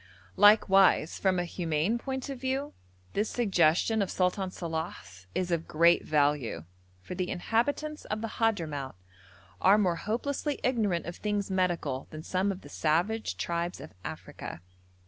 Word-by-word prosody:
Likewise 195 -5 +5
from 190 -2 +2
a 175 - 0
humane 170 +5 -1
point 265 +1 -4
of 265 -3 -6
view, 270 +2 -2 0.4
this 210 +2 0
suggestion 200 -1 +2
of 195 - 0
Sultan 185 +1 0
Salàh's 160 - -6
is 180 -1 -1
of 165 -1 -1
great 170 +2 +4
value, 145 - +1 0.4
for - - -6
the 180 0 -2
inhabitants 285 +10 -1
of 215 0 -3
the 225 - -3
Hadhramout 155 - 0 0.7
are 195 +2 +6
more 180 -5 +2
hopelessly 280 - -2
ignorant 210 -9 +1
of 170 - -6
things 205 -2 -2
medical 175 -8 -1
than 155 0 -8
some 190 +3 0
of 190 - -7
the - - -12
savage 170 - 0
tribes 170 - -2
of - - -10
Africa. 85 - -7
185 Hz, 145 wpm, -29 LUFS, 165-220 Hz, 0.7 s, are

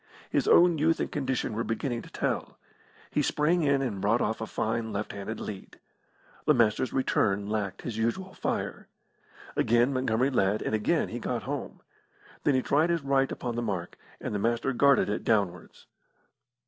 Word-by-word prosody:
His - - +1
own 170 -2 +6
youth 160 +2 +2
and - - -2
condition 130 -5 -1
were 115 +2 -1
beginning 120 +1 -2
to - - -13
tell. - - -2 0.5
He 150 - +1
sprang 155 +4 +2
in 140 -2 +2
and 105 -7 -3
brought 110 +4 +3
off 110 0 -1
a 110 - -3
fine 110 0 -2
left 105 +1 -3
handed 100 +2 -6
lead. 100 -3 -8 0.7
The 150 - +6
Master's 115 +1 +2
return 100 -6 +1
lacked 105 -2 -3
his 115 -3 -4
usual 185 +13 -1
fire. - - -3 0.7
Again 120 +4 +3
Montgomery 130 0 +1
led, 105 -4 +1
and - - -2
again 110 -1 +1
he - - -5
got - - -3
home. - - -5 0.6
Then 145 - +4
he 130 - +1
tried 155 +4 +2
his 170 -3 0
right 135 -1 +2
upon 120 -1 -3
the 120 - -1
mark, 95 -7 -3 0.2
and - - -4
the 105 - -1
Master 120 +5 0
guarded 140 +3 +4
it 105 - -2
downwards. 100 -5 -1
120 Hz, 175 wpm, -28 LUFS, 105-140 Hz, 0.7 s, own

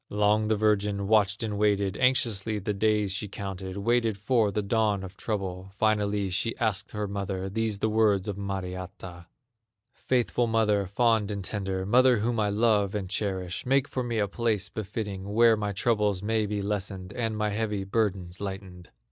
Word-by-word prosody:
Long 105 +1 +2
the 110 - +2
virgin 105 -1 +1
watched 105 0 +3
and 105 -2 -3
waited, 100 -2 +2
Anxiously 115 -5 +2
the 105 +1 -2
days 105 -1 +1
she 100 +2 -2
counted, 95 -1 -6
Waiting 115 +1 +1
for 110 +2 +2
the 105 +1 -1
dawn 105 -2 +1
of 95 0 -9
trouble. 95 -3 -4
Finally 105 -2 +1
she 115 +5 -1
asked 110 -6 -1
her 105 -1 -2
mother, 95 -1 -3
These 110 0 -1
the 110 - 0
words 105 -3 +2
of 105 - -2
Mariatta: 95 -2 -6 0.7
"Faithful 120 -1 0
mother, 105 -3 +2
fond 110 +1 +2
and 100 -2 -4
tender, 95 -1 -3
Mother 125 +4 +5
whom 115 +2 0
I 105 -1 +2
love 105 -2 +2
and 95 -3 -4
cherish, 95 -4 -2
Make 135 +2 +2
for 130 - -3
me 120 -2 -2
a 105 -2 +1
place 105 -2 -1
befitting, 100 -1 -5
Where 115 0 +6
my 105 -1 -2
troubles 105 -2 +1
may 110 0 +1
be 105 -1 -2
lessened, 100 -2 -4
And 115 -2 -2
my 105 0 0
heavy 105 -1 -2
burdens 95 -4 -1
lightened." 95 -3 -7
105 Hz, 175 wpm, -27 LUFS, 95-110 Hz, 0.7 s, Where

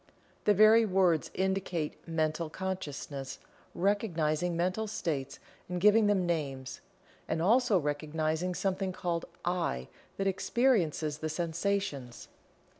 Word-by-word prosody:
The 210 - +5
very 215 +3 +7
words 185 -6 +2
indicate 190 -4 -1
Mental 160 0 -1
Consciousness 150 -7 -5 0.4
recognizing 175 -4 0
mental 185 +5 0
states 145 -9 -3 0.3
and 180 0 -2
giving 210 +3 +5
them 195 -3 +2
names, 140 -6 -3 0.5
and 160 - -1
also 225 +4 +4
recognizing 155 +3 -1
something 190 0 -1
called 170 -2 -2 0.2
"I" 170 - -1 0.3
that 195 - -1
experiences 190 - +1
the 155 - -3
sensations. 165 -5 -2
175 Hz, 110 wpm, -31 LUFS, 155-195 Hz, 0.5 s, very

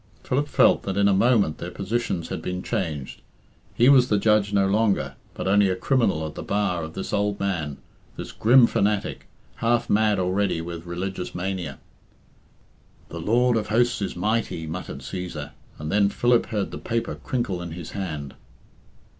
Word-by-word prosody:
Philip 140 +3 0
felt - - +4
that 95 0 -3
in 100 0 +4
a 100 - +4
moment 100 -6 +3
their 85 - -5
positions 100 -2 -2
had - - -4
been 90 0 -4
changed. 80 - -3 0.5
He 120 - +4
was 130 -3 +6
the 105 - +3
judge 105 -1 +3
no 100 -1 +3
longer, 105 +1 +1 0.2
but - - -4
only 100 0 +4
a 95 - 0
criminal 100 - +1
at 75 - -6
the - - -7
bar 100 -4 0
of 80 0 -7
this 95 - -5
old 105 0 0
man, 80 -8 -2 0.4
this - - -6
grim 120 +2 +6
fanatic, 105 -2 -1 0.3
half 120 +1 +1
mad 105 -1 +3
already 95 0 0
with 85 0 -7
religious 90 +1 -4
mania. 95 0 -3 1.3
"The 85 - -6
Lord 120 +6 +3
of 110 -2 -1
Hosts 120 +1 +2
is 100 - -3
mighty," 105 -3 -1
muttered 80 -3 -6
Cæsar; 75 -1 -6 0.3
and 75 +1 -5
then 100 0 +3
Philip 120 +2 +2
heard 105 -4 -2
the - - -6
paper 115 0 -2
crinkle 110 -8 -3
in 85 -2 -6
his 85 -1 -8
hand. 75 -8 -5
100 Hz, 170 wpm, -24 LUFS, 90-110 Hz, 1.3 s, was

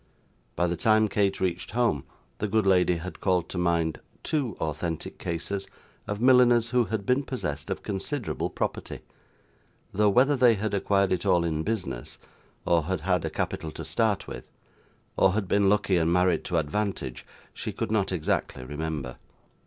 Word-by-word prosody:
By 90 - +1
the 85 0 0
time 110 +4 +3
Kate 100 -2 +1
reached 90 -2 -2
home, 115 - +1 0.3
the 105 - -1
good 110 0 +1
lady 90 -2 +4
had 90 +2 -7
called 90 -3 +1
to 90 - -3
mind 85 -2 +1 0.2
two 135 - -1
authentic 80 +1 -3
cases 85 +4 -3 0.4
of 105 0 -3
milliners 120 -2 +5
who 125 -2 +3
had 105 -2 -3
been 125 +4 +2
possessed 75 - -4
of - - -3
considerable 105 +5 -3
property, - - -4 0.9
though 105 +1 +3
whether 130 +8 +4
they 125 -3 +5
had 105 0 -2
acquired 100 -1 +2
it 90 -2 0
all 85 -1 +3
in 80 -2 -1
business, 95 - -3 0.5
or 85 -3 +2
had 95 -2 -2
had 90 +1 +1
a - - -1
capital 80 - -3
to - - -7
start 110 -4 0
with, - - -7 0.7
or 95 -1 +4
had 105 -2 -1
been 100 +1 +3
lucky 100 -2 +2
and 80 0 +2
married 90 0 +2
to 85 - -1
advantage, 80 - -2 0.3
she - - -5
could - - -3
not 105 -3 +1
exactly 80 -6 -1
remember. 75 -2 -4
95 Hz, 170 wpm, -27 LUFS, 85-110 Hz, 0.9 s, milliners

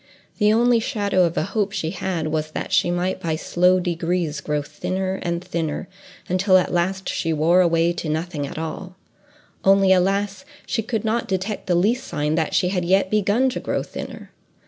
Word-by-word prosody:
The 210 -1 +4
only 235 +1 +4
shadow 205 -6 +1
of 170 - -3
a - - +2
hope 200 +2 -1
she 165 -6 -2
had 175 -4 -2
was, 155 0 -2
that - - -4
she - - +3
might 180 +2 -1
by 165 -3 -1
slow 180 +3 +2
degrees 170 -3 -1
grow 150 0 -1
thinner 190 +5 -3
and 170 0 -2
thinner, 170 -2 -3 0.4
until 185 +1 +4
at 180 - 0
last 185 +2 0
she 165 - -1
wore 165 +4 +4
away 170 -1 +2
to 170 -2 -4
nothing 155 -2 -2
at - - -8
all; 175 +3 -5 0.7
only 195 0 +5
alas! 195 +2 0 0.2
she 240 - -1
could 225 -1 -3
not 225 +2 0
detect 195 +2 -3
the 180 - +2
least 225 +9 +2
sign 150 +1 -1
that 160 -1 0
she 180 - +2
had 180 -2 -1
yet 190 +2 +2
begun 215 +5 +2
to 250 - -4
grow - - -2
thinner. - - -8
180 Hz, 190 wpm, -22 LUFS, 165-195 Hz, 0.7 s, only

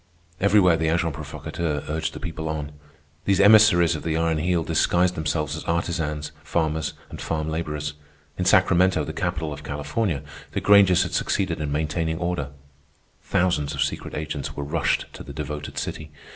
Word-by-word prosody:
Everywhere 95 -4 +5
the 80 0 0
agents 85 -2 0
provocateurs 75 -2 -4
urged 80 +1 -2
the - - -6
people 80 -3 -5
on. 75 -1 -4 0.5
These 100 -1 +2
emissaries 100 -5 +6
of 75 - -5
the 80 -1 -1
Iron 80 -1 +1
Heel 85 +1 +1
disguised 90 +2 +2
themselves 75 -2 -1
as 80 - -6
artisans, 80 -3 -2
farmers, 80 -1 -1 0.2
and - - -8
farm 80 -1 -2
laborers. 75 -2 -3 0.4
In 90 - -2
Sacramento, 90 0 +4
the - - -5
capital 80 -3 -2
of - - -9
California, 75 +2 -2 0.3
the - - 0
Grangers 100 -3 +6
had - - -5
succeeded - - 0
in 75 -2 -2
maintaining 80 +2 -1
order. 85 -5 -2 0.7
Thousands 80 -5 0
of 70 - +2
secret 75 - -4
agents 75 -1 -4
were 70 - -4
rushed 80 +4 0
to - - -10
the - - -9
devoted 75 -1 -6
city. 75 -1 -4
80 Hz, 165 wpm, -24 LUFS, 75-90 Hz, 0.7 s, emissaries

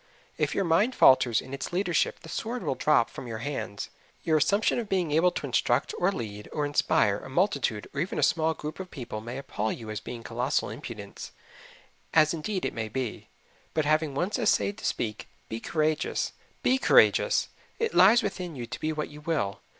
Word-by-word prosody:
If - - -1
your 200 - +2
mind 205 +10 +3
falters 125 -3 +5
in 130 - -10
its 140 - -4
leadership 175 -1 0
the - - -12
sword 230 +8 -4
will - - 0
drop 140 -3 +3
from 130 - -8
your 115 -2 -4
hands. 135 -8 -4 0.3
Your 160 -1 +3
assumption 200 +10 +2
of 225 -3 -5
being 180 -5 0
able 165 +4 +4
to - - -5
instruct - - +1
or - - +3
lead 105 - -6
or 150 - -1
inspire 105 -8 +2
a - - -10
multitude 140 - 0
or 140 - -1
even 180 - -3
a - - +1
small 160 0 +2
group 150 +4 -6
of 190 -1 -6
people 120 -8 -6
may 120 +3 -6
appall 110 -5 -2
you 110 -2 -6
as 105 - -3
being 115 +2 -8
colossal - - -1
impudence - - -8 0.8
as 155 0 +5
indeed 185 +4 -3
it - - -2
may 110 -1 -4
be; 125 0 -4 0.5
but 155 -2 +1
having 155 -1 +1
once 185 - -1
essayed 205 -2 +1
to - - -7
speak, 110 -2 -2 0.2
be 110 - -4
courageous. 155 +3 -1 0.3
BE 260 +1 +3
courageous - - +4 0.3
it 455 -1 -1
lies 220 +5 +6
within 180 -4 -4
you 120 -3 -5
to 115 - -7
be 155 - -1
what 150 -1 -3
you 150 0 -11
will. 150 -12 -1
155 Hz, 195 wpm, -28 LUFS, 120-180 Hz, 0.8 s, lies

